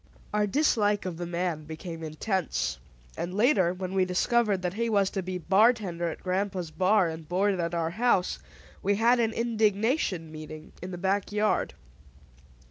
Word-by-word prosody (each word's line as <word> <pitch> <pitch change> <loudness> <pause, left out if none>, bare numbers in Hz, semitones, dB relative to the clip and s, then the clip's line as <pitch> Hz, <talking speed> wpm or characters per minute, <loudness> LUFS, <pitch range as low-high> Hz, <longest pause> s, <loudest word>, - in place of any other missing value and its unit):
Our 210 0 +2
dislike 210 -5 +2
of 180 -3 -4
the 175 0 -4
man 170 -3 -2
became 165 +1 -7
intense; 155 - -2 0.4
and 180 +2 -4
later, 205 - +3
when 185 0 -5
we 190 -1 +3
discovered 195 +2 +1
that 180 0 -1
he 230 +3 -1
was 200 -3 +2
to 195 - -2
be 185 0 -4
bartender 190 -2 +2
at 160 - -8
grandpa's 185 -2 -2
bar, 190 +2 +3
and 160 -1 -7
board 190 +1 +1
at 170 0 -1
our 165 -1 -1
house, 220 -2 +1 0.4
we 200 +1 +2
held 235 +4 +4
an 225 -1 +2
indignation 220 - 0
meeting 155 0 -9
in 180 - -6
the 180 - -6
back 195 +3 0
yard. 210 +1 0
185 Hz, 165 wpm, -28 LUFS, 170-210 Hz, 0.4 s, held